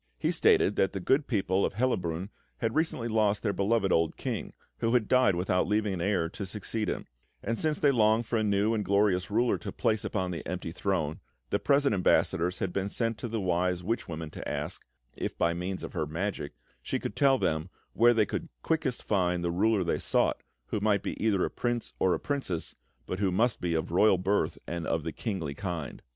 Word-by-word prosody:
He -, -, 0 dB
stated 100 Hz, -, +3 dB
that 95 Hz, -, +2 dB
the 95 Hz, -, -3 dB
good 135 Hz, -, +2 dB
people 100 Hz, -4 st, +1 dB
of -, -, -1 dB
Hellabrunn 95 Hz, -7 st, -1 dB, 0.3 s
had 115 Hz, -1 st, -1 dB
recently 155 Hz, -6 st, 0 dB
lost 110 Hz, -2 st, +1 dB
their 105 Hz, -3 st, +1 dB
beloved 100 Hz, 0 st, +1 dB
old 80 Hz, -1 st, +2 dB
King, -, -, -4 dB, 0.3 s
who 115 Hz, +2 st, +1 dB
had 115 Hz, -4 st, +2 dB
died 125 Hz, -7 st, +4 dB
without 90 Hz, +1 st, +1 dB
leaving 105 Hz, 0 st, +1 dB
an 90 Hz, -, -3 dB
heir 95 Hz, -3 st, +1 dB
to 100 Hz, -, -6 dB
succeed 105 Hz, +1 st, -2 dB
him; -, -, -3 dB, 0.4 s
and 115 Hz, -, -2 dB
since 155 Hz, -1 st, +1 dB
they 145 Hz, -, +4 dB
longed 110 Hz, -1 st, +3 dB
for 115 Hz, -, -1 dB
a -, -, +1 dB
new 105 Hz, +1 st, +2 dB
and 110 Hz, -2 st, 0 dB
glorious 100 Hz, -2 st, +2 dB
ruler 115 Hz, +4 st, +2 dB
to -, -, -6 dB
place 110 Hz, -2 st, 0 dB
upon 95 Hz, -4 st, -2 dB
the 85 Hz, -, -5 dB
empty 90 Hz, -2 st, -4 dB
throne, 85 Hz, -4 st, -1 dB, 0.3 s
the -, -, +2 dB
present 140 Hz, -3 st, +3 dB
ambassadors 90 Hz, -1 st, +2 dB
had 90 Hz, -2 st, -2 dB
been 100 Hz, 0 st, -1 dB
sent 115 Hz, +1 st, -1 dB
to -, -, -4 dB
the 115 Hz, 0 st, -2 dB
wise 90 Hz, -1 st, 0 dB
witch 115 Hz, +6 st, -2 dB
woman 80 Hz, -1 st, -6 dB
to -, -, -6 dB
ask -, -, -4 dB, 0.3 s
if, -, -, -4 dB
by 85 Hz, -, +2 dB
means 90 Hz, +2 st, -4 dB
of -, -, -6 dB
her 75 Hz, -, -1 dB
magic, 80 Hz, -1 st, -3 dB, 0.3 s
she -, -, -2 dB
could -, -, -5 dB
tell 135 Hz, -2 st, +4 dB
them 80 Hz, -5 st, -1 dB, 0.2 s
where 120 Hz, +1 st, +5 dB
they 110 Hz, -2 st, +4 dB
could -, -, -4 dB
quickest 155 Hz, -6 st, -1 dB
find 90 Hz, -4 st, +1 dB
the 85 Hz, -, 0 dB
ruler 100 Hz, +2 st, +2 dB
they 85 Hz, -, 0 dB
sought, -, -, +1 dB, 0.3 s
who 105 Hz, -, -1 dB
might 105 Hz, 0 st, +2 dB
be -, -, -3 dB
either 100 Hz, -4 st, +2 dB
a -, -, -4 dB
prince 120 Hz, -1 st, -2 dB
or 95 Hz, -, +3 dB
a -, -, -4 dB
princess, 135 Hz, -, -3 dB, 0.3 s
but 90 Hz, -, -4 dB
who 100 Hz, -2 st, +1 dB
must 110 Hz, +5 st, +1 dB
be 85 Hz, -2 st, 0 dB
of 80 Hz, +1 st, -2 dB
royal 95 Hz, +2 st, +5 dB
birth 95 Hz, +3 st, 0 dB
and 85 Hz, -1 st, -4 dB
of 80 Hz, -1 st, 0 dB
the 80 Hz, -, -3 dB
kingly 90 Hz, -, -3 dB
kind. 85 Hz, -5 st, -5 dB
100 Hz, 215 wpm, -29 LUFS, 90-115 Hz, 0.4 s, where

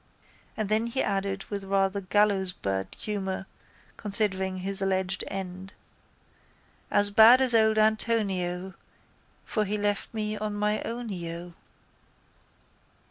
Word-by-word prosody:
And 215 Hz, -2 st, -1 dB
then 215 Hz, +3 st, +1 dB
he 260 Hz, +3 st, 0 dB
added 195 Hz, -1 st, -2 dB
with 200 Hz, -1 st, -3 dB
rather 195 Hz, 0 st, +1 dB
gallowsbird 185 Hz, -, 0 dB
humour 195 Hz, -2 st, -4 dB, 0.5 s
considering 195 Hz, -3 st, 0 dB
his 195 Hz, +2 st, -3 dB
alleged 190 Hz, -1 st, -1 dB
end: 190 Hz, 0 st, -6 dB, 1.2 s
—As 205 Hz, 0 st, +3 dB
bad 225 Hz, +4 st, +8 dB
as 260 Hz, -2 st, +6 dB
old 220 Hz, -1 st, +4 dB
Antonio, 195 Hz, -5 st, 0 dB, 0.7 s
For 215 Hz, -, 0 dB
he 210 Hz, +1 st, -2 dB
left 205 Hz, 0 st, -1 dB
me 215 Hz, -1 st, -3 dB
on 210 Hz, 0 st, -3 dB
my 210 Hz, +1 st, 0 dB
ownio. 175 Hz, -7 st, -6 dB
200 Hz, 110 wpm, -27 LUFS, 190-215 Hz, 1.2 s, bad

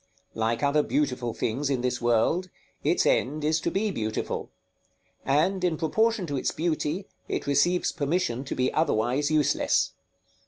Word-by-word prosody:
Like 115 Hz, +3 st, -1 dB
other 145 Hz, +1 st, +3 dB
beautiful 130 Hz, -5 st, -1 dB
things 135 Hz, +5 st, -1 dB
in 135 Hz, -3 st, 0 dB
this 125 Hz, -1 st, -1 dB
world, 120 Hz, +10 st, +2 dB, 0.3 s
its -, -, +2 dB
end 150 Hz, +4 st, +1 dB
is 155 Hz, +1 st, +1 dB
to -, -, 0 dB
be 205 Hz, +2 st, 0 dB
beautiful; 110 Hz, -, -3 dB, 0.7 s
and, 170 Hz, +7 st, +1 dB
in 170 Hz, -3 st, +1 dB
proportion 220 Hz, +6 st, +1 dB
to 145 Hz, -4 st, -3 dB
its -, -, 0 dB
beauty, 165 Hz, +2 st, -2 dB, 0.2 s
it -, -, -3 dB
receives 160 Hz, +6 st, +2 dB
permission 150 Hz, -4 st, -1 dB
to -, -, -4 dB
be 130 Hz, 0 st, 0 dB
otherwise 145 Hz, -1 st, +1 dB
useless. 155 Hz, -3 st, +2 dB
145 Hz, 150 wpm, -27 LUFS, 125-170 Hz, 0.7 s, other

